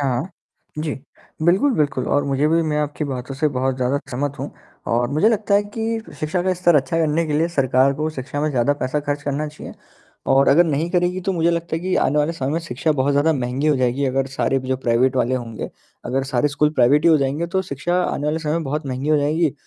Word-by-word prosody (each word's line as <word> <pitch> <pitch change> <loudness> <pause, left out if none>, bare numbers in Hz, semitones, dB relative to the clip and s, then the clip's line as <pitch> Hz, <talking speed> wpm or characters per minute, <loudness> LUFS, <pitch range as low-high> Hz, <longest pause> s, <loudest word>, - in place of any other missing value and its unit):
हाँ। 130 -3 0 0.6
जी। 155 -2 -2 0.5
बिल्कुल, 190 - +3
बिल्कुल 145 - 0
और 145 - +1
मुझे 140 +1 +1
भी 165 +1 +3
मैं 150 -2 -1
आपकी 150 +1 -3
बातों 130 -1 -5
से 150 +3 +1
बहुत 130 -1 -1
ज़्यादा 130 +2 0
समझ 140 +3 -1
हूँ - - -5 0.4
और 120 +1 +1
मुझे 155 +9 +4
लगता 210 -2 +1
है 200 - +4
कि 225 +2 -3
फ - - -12
शिक्षा 170 +4 -1
का 185 - +1
स्तर 175 -1 +3
अच्छा 135 +3 0
करने 160 +1 +1
के 155 - -2
लिए 160 +3 +2
सरकार 135 -3 +2
को 155 +3 -2
शिक्षा 140 0 -5
में 155 - +1
ज़्यादा 130 0 +2
पैसा 130 +4 -1
खर्च 145 0 -3
करना 145 +1 -2
चाहिए, 150 - -10 0.5
और 135 +1 +4
अगर 165 +6 +6
नहीं 160 +1 -1
करेगी 180 +1 +1
तो 190 +1 -1
मुझे 170 -1 +2
लगता 170 -1 -2
है - - -4
कि 185 +1 -1
आने 140 +3 +2
वाले 150 +2 +1
समय 135 -5 -3
में 165 - +1
शिक्षा 155 0 -1
बहुत 140 0 +1
ज़्यादा 145 +3 +3
महँगी 130 +1 -2
हो 150 -2 +3
जाएगी 130 +2 0
अगर 135 0 0
सारे 135 0 0
भी 130 0 -8
जो 130 - +1
प्राइवेट 125 +1 +1
वाले 125 0 +1
होंगे। 115 -3 -5 0.3
अगर 135 +2 -1
सारे 135 +1 +1
स्कूल 150 +1 +1
प्राइवेट 140 +3 +4
ही 170 - +6
हो 160 - +6
जाएँगे 140 +4 -1
तो 190 +2 -1
शिक्षा 170 +2 -2
आने 145 - -2
वाले 155 +2 0
समय 155 0 -1
बहुत 150 +2 -3
महँगी 130 +2 -3
हो 155 - +4
जाएगी। 150 +1 +1
145 Hz, 240 wpm, -21 LUFS, 135-165 Hz, 0.6 s, अगर